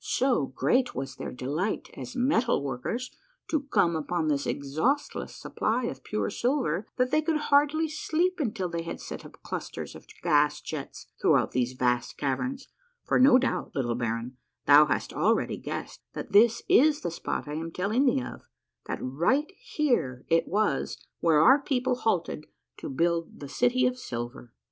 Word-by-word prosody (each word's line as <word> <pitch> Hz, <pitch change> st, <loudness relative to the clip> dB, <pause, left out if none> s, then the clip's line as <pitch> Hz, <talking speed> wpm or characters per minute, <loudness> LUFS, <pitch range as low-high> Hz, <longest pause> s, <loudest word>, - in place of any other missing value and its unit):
So 250 Hz, -, +1 dB
great 245 Hz, -, +1 dB
was 135 Hz, 0 st, -4 dB
their -, -, -5 dB
delight 145 Hz, -, -3 dB
as 250 Hz, -, -8 dB
metal 250 Hz, -, +2 dB
workers 140 Hz, -, -3 dB, 0.4 s
to 310 Hz, -, +2 dB
come 170 Hz, -1 st, +3 dB
upon 160 Hz, +1 st, -1 dB
this 140 Hz, -1 st, 0 dB
exhaustless 155 Hz, -, -1 dB
supply 240 Hz, +3 st, -1 dB
of 135 Hz, -, -4 dB
pure 105 Hz, -2 st, -2 dB
silver 240 Hz, -, 0 dB
that 250 Hz, 0 st, +1 dB
they 310 Hz, -, +3 dB
could 310 Hz, 0 st, +1 dB, 0.2 s
hardly 295 Hz, +3 st, +4 dB
sleep 325 Hz, +4 st, -1 dB
until 210 Hz, -, -1 dB
they 170 Hz, -1 st, -3 dB
had 165 Hz, -, -6 dB
set -, -, -7 dB
up -, -, -15 dB
clusters -, -, -5 dB
of -, -, -13 dB, 0.2 s
gas 150 Hz, -3 st, +3 dB
jets 150 Hz, -3 st, -7 dB, 0.2 s
throughout -, -, +3 dB
these 125 Hz, 0 st, 0 dB
vast 125 Hz, -1 st, 0 dB
caverns, 255 Hz, -, -2 dB, 0.4 s
for, -, -, +2 dB
no 255 Hz, 0 st, +7 dB
doubt, 260 Hz, -, -2 dB
little 120 Hz, -4 st, 0 dB
baron, 115 Hz, +1 st, -3 dB, 0.3 s
thou 145 Hz, +1 st, +8 dB
hast 130 Hz, -, -2 dB
already -, -, +1 dB
guessed -, -, -6 dB
that -, -, -6 dB
this 225 Hz, +3 st, +5 dB
is 295 Hz, +3 st, +5 dB
the 175 Hz, -, -3 dB
spot 165 Hz, -, -4 dB
I 150 Hz, -, -5 dB
am 165 Hz, +2 st, -4 dB
telling 215 Hz, +11 st, +1 dB
thee 135 Hz, -, +2 dB
of; 120 Hz, -, -8 dB, 0.5 s
that -, -, -2 dB
right 175 Hz, -, 0 dB
here 245 Hz, -, -1 dB
it 165 Hz, 0 st, +3 dB
was 210 Hz, +3 st, 0 dB, 0.2 s
where 160 Hz, -3 st, +4 dB
our 265 Hz, -, +7 dB
people 255 Hz, -2 st, 0 dB
halted 175 Hz, -9 st, -1 dB, 0.3 s
to -, -, -6 dB
build 170 Hz, +4 st, -1 dB
the 145 Hz, -, -7 dB
City 245 Hz, -, +2 dB
of 250 Hz, 0 st, 0 dB
Silver. 120 Hz, -, -6 dB
175 Hz, 170 wpm, -28 LUFS, -, 0.5 s, thou